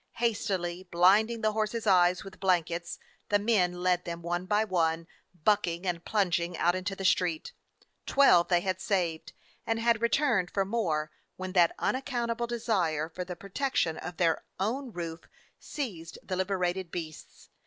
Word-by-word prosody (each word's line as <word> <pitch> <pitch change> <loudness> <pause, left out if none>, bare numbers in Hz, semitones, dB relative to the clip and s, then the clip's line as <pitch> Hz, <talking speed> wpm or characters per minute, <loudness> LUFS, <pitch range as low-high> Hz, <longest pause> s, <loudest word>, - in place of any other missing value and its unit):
Hastily 190 -6 -2
blinding 205 +7 +4
the 215 -1 +2
horses' 220 +1 -2
eyes 180 -2 +4
with 195 -1 -12
blan 185 -3 +3
kets, 170 +2 -5 0.3
the 205 - +4
men 185 -5 +1
led 180 -1 +2
them, 170 -1 -6
one 175 +2 -2
by 210 +1 +3
one, 165 -5 0 0.4
bucking 185 -3 +1
and 175 -2 -2
plunging, 175 -4 0
out 175 - +3
into 185 +2 -3
the 195 - -5
street. 175 -4 +1 0.5
Twelve 180 -12 +5
they 175 -1 +3
had 185 0 -2
saved 175 -6 -1 0.3
and 225 - -1
had 230 -1 +2
returned 235 -6 +2
for 195 -1 0
more 165 -8 -1 0.2
when 185 0 -5
that 175 -3 +4
unaccountable 240 -3 -1
desire 185 -10 0
for 180 +2 -5
the 180 0 -7
protec 205 +10 -4
tion 160 -1 +1
of 175 -2 -7
their 165 -2 +1 0.2
own 245 +6 -2
roof 170 -3 -6 0.3
seized 185 - -6
the 185 - -3
liberated 185 -1 -1
beasts. 160 -3 -8
185 Hz, 160 wpm, -29 LUFS, 175-215 Hz, 0.5 s, Twelve